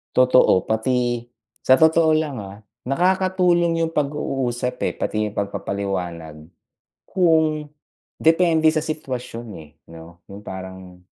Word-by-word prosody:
Totoo, 125 -7 +4
pati 120 +2 0 0.4
sa 130 - +5
totoo 160 0 +4
lang, 150 -4 -2
ah, 100 0 -10 0.3
nakakatulong 180 +1 +2
yong 165 - -7
pag-uusap, 135 -4 -2
eh, - - -7
pati 105 0 -1
yung 105 - -16
pagpapaliwanag. 90 -6 -4 0.6
Kung 160 -4 +1 0.5
depende 160 -1 +3
sa 155 0 +1
situwasyon, 125 -6 -5 0.2
eh, 75 - -19 0.2
'no? 85 +1 -13
Yung 100 +1 -11
parang 95 -1 -9
130 Hz, 115 wpm, -21 LUFS, 100-160 Hz, 0.6 s, sa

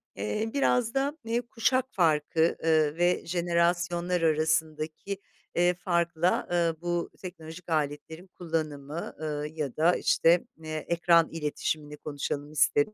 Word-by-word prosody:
eee, 105 - -2
biraz 250 -4 +2
da, 280 +3 0
eee, 230 +2 0
kuşak 250 +2 +1
farkı, 160 -1 +2
ııı, 155 -2 +3
ve 175 +1 +2
jenerasyonlar 175 0 +1
arasındaki, 160 +3 0 0.4
ııı, 175 +1 +4
farkla, 170 -1 0
ııı, 170 -2 +2
bu 175 -1 -1
teknolojik 170 -1 -9
aletlerin 160 +3 -2
kullanımı, 160 -3 -4
ııı, 150 -1 -2
ya 150 -4 -4
da 170 +3 +4
işte, 170 +2 +3 0.2
eee, 155 0 -5
ekran 170 -1 +4
iletişimini 150 -1 -3
konuşalım 145 0 -4
isterim. 150 +5 +2
165 Hz, 120 wpm, -28 LUFS, 155-175 Hz, 0.4 s, ııı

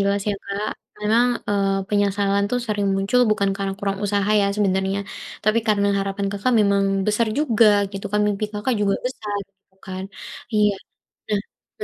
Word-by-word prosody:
jelas 200 +1 +1
ya, 205 - +1
Kak. 200 +2 -3 0.3
Memang, 225 +4 +3 0.2
eee, 195 -1 +1
penyesalan 200 -1 +1
tuh 250 - +1
sering 205 -2 0
muncul 195 +6 +2
bukan 200 -2 +2
karena 195 -1 -2
kurang 195 -1 -2
usaha 205 0 +1
ya 200 - +3
sebenarnya, 190 -1 +1 0.5
tapi 215 +2 +3
karena 200 -1 +3
harapan 195 0 -2
Kakak 205 +5 0
memang 200 -1 +3 0.2
besar 210 +2 +2
juga 235 -7 +4 0.3
gitu 195 0 -5
kan, 210 - +2
mimpi 205 0 0
Kakak 220 +4 -1
juga 200 -1 +2
besar, 210 -5 -4
gitu 195 0 -42
kan. 185 0 -5 0.5
Iya 210 -1 +4 0.6
nah 210 -1 +1 0.4
be 425 - -3
200 Hz, 165 wpm, -22 LUFS, 195-210 Hz, 0.6 s, juga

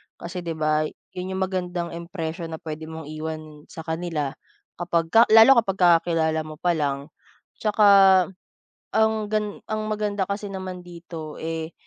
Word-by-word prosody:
Kasi 175 +2 -6
'di 165 -2 -4
ba, 155 0 +1 0.2
yun 185 +1 -5
yung 190 - 0
magandang 180 -2 -3
impression 170 -1 -5
na 160 - -5
puwede 155 0 -7
mong 160 -1 -8
iwan 155 -1 -7
sa 160 - -9
kanila 160 -4 -2 0.5
kapagka 175 +6 +3
lalo 225 +5 +8
kapagka 185 -5 +4
kakilala 160 -2 0
mo 155 - -8
pa 175 - +2
lang, 140 -1 -2 0.5
tsaka 210 -1 +3 1.1
ang 220 -1 +2
gan 210 -1 -1
ang 215 0 -2
maganda 205 -2 -1
kasi 200 +1 -3
naman 185 -1 -6
dito, 170 -3 -9
eh, 160 0 -4
170 Hz, 145 wpm, -24 LUFS, 160-190 Hz, 1.1 s, lalo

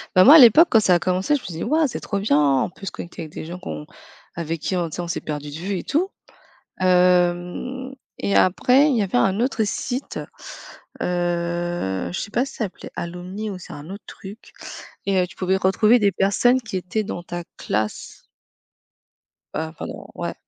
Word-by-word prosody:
Bah 185 - +8
moi, 290 +5 +10
à - - +12
l'époque, 275 +8 +8
quand 225 - +6
ça 185 -4 +4
a - - +2
commencé, 185 +10 +1
je 275 - -2
me - - -14
suis 180 - -6
dit: 165 - -4
«Ouah, 310 +5 +2
c'est - - -5
trop 200 - -3
bien, 195 -8 +2 0.2
on - - -3
peut 195 - -12
se - - -3
connecter 170 0 -8
avec 155 - -10
des - - -6
gens 175 +2 -7
qu'on 75 - -6 0.5
avec 165 -1 -4
qui, 160 +4 -1
on 175 -2 -1
tu - - -7
sais, 175 - -3
on 170 - -5
s'est 170 - -3
perdus 150 -1 -5
de - - -8
vue 190 +1 -2
et - - -7
tout». 360 +6 0 0.7
Hem, 180 +8 +1 0.2
et 200 - -1
après, 255 +10 +4
il 265 - +2
y 220 - +2
avait 185 -10 0
un 190 - +2
autre 245 -2 +1
site, 250 +5 -4 0.8
heu, 175 - -1
je - - -3
sais 205 - -5
pas 245 +4 +1
si 275 - -10
ça 220 - -1
s'appelait 190 - -10
Alumni 180 +5 -5
ou 190 - -6
c'est - - -10
un 145 +4 -10
autre 200 +2 -8
truc. 200 +4 -11 0.5
Et, 195 -1 +2
heu, 180 - -1
tu - - -16
pouvais 190 +1 +1
retrouver 215 +5 +4
des 200 -1 +3
personnes 245 +7 +2
qui 210 -4 -4
étaient 185 +4 -2
dans 175 -4 -6
ta 175 0 -6
classe. 105 +1 -3 1.3
Heu, 160 0 -3
pardon, - - -8
ouais. - - -4
185 Hz, 215 wpm, -22 LUFS, 175-220 Hz, 1.3 s, à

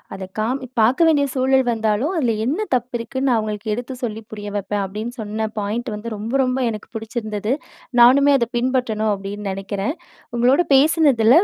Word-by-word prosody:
அத 190 -1 -7
காமி 255 +4 -1
பார்க்க 260 +10 +4
வேண்டிய 290 -3 +4
சூழல் 265 0 +3
வந்தாலும், 225 - 0
அதில 235 -6 +1
என்ன 290 - 0 0.2
தப்பு 245 0 -3
இருக்குன்னு 260 +4 -2
நான் 240 - +3
அவுங்களுக்கு 215 0 -3
எடுத்து 245 +3 -6
சொல்லி 220 -1 -3
புரிய 205 -1 -6
வைப்பேன். 205 0 -2
அப்பிடின்னு 215 +6 -6
சொன்ன 215 +1 -3
பாயிண்ட் 220 +4 -3
வந்து 215 +1 -5
ரொம்ப, 220 +4 -5
ரொம்ப 255 +1 -1
எனக்கு 215 -1 -8
பிடிச்சிருந்தது. 220 -1 -3 0.5
நானுமே 280 +4 +7
அத 235 - +1
பின்பற்றணும் 235 -4 0
அப்பிடின்னு 200 0 -5
நினைக்கிறேன். 195 +6 -3 0.4
உங்களோட 250 +6 +4
பேசினதில 285 - +5
230 Hz, 165 wpm, -21 LUFS, 210-260 Hz, 0.5 s, நானுமே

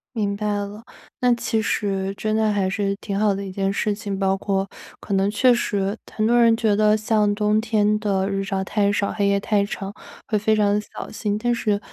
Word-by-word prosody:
明 205 -3 0
白 210 +1 -4
了， 205 +1 -3 0.4
那 250 -1 +4
其 225 -1 -1
实 195 -2 -1
真 215 0 -1
的 220 -1 +2
还 200 -2 0
是 200 0 -1
挺 200 -2 -4
好 210 0 +3
的 200 +1 -4
一 - - -6
件 195 +1 -1
事 205 +1 0
情， 200 -1 -4
包 195 -1 +2
括 195 0 -1 0.3
可 - - -5
能 195 +1 +2
确 245 +4 +4
实 205 -3 -1 0.2
很 215 0 +1
多 240 +1 +4
人 230 -1 +5
觉 220 -3 +2
得 215 0 +4
像 215 -1 +1
冬 210 +1 +1
天 215 -2 +2
的 200 -2 0
日 195 0 -1
照 195 -1 -2
太 200 0 +1
少， 205 0 0
黑 200 -2 +1
夜 200 0 +2
太 205 0 +1
长， 200 -1 -5 0.3
会 215 - +1
非 215 +2 +2
常 205 -1 +3
得 210 - -1
小 - - -9
心。 210 -1 -2
但 240 +2 0
是 210 -3 0
205 Hz, 240 characters per minute, -22 LUFS, 200-215 Hz, 0.4 s, 人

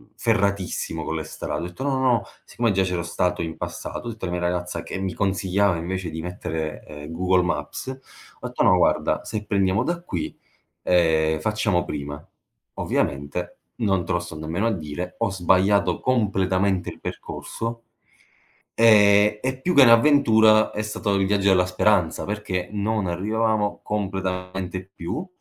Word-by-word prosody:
ferratissimo 100 -7 0
con 80 - -3
le 80 - -2
strade, 80 - -5
ho - - -3
detto: 90 +9 -7
"No, 140 - 0
no, 130 - 0
no", - - +2 0.2
siccome 115 -2 0
già 95 0 +2
c'ero 90 -2 -2
stato 90 +1 -1
in 80 -1 -4
passato, - - -6
ho - - -2
detto 110 -3 -7
alla 90 - -3
mia 90 - -3
ragazza, 90 0 -2
che - - -6
mi 95 -2 -2
consigliava 95 0 +1
invece 90 +1 -3
di 80 0 -5
mettere, 80 -3 -4
uhm, 75 +1 -9
Google 90 +1 +2
Maps, 75 - -3 0.5
ho - - -5
detto: - - -1
"No, - - +6
guarda, - - +2
se 105 -1 -4
prendiamo 100 +1 +1
da 170 +2 -2
qui, 90 - -4 0.5
ehm, 80 -3 +2
facciamo 105 -3 0
prima." 75 -2 -6 0.5
Ovviamente 70 +6 -2 0.3
non 95 -4 +1
te 95 - -2
lo 85 - +2
sto 85 -2 -8
nemmeno 80 +7 -2
a - - +1
dire, 90 0 -5
ho - - 0
sbagliato 95 +2 +2
completamente 95 -5 0
percorso. 115 0 -6 0.9
Ehm, 105 -2 +6
e 130 0 -2
più 180 - +1
che 140 - +8
un'avventura, 115 -4 +6
è 105 - -3
stato 105 -1 -2
il 95 -1 +2
viaggio 100 0 +2
della 90 -1 +4
speranza 90 -2 +1
perché 100 -4 -3
non 105 -1 -1
arrivavamo 105 +3 0
completamente 95 -2 -3
più, 120 - -4
95 Hz, 160 wpm, -23 LUFS, 90-105 Hz, 0.9 s, che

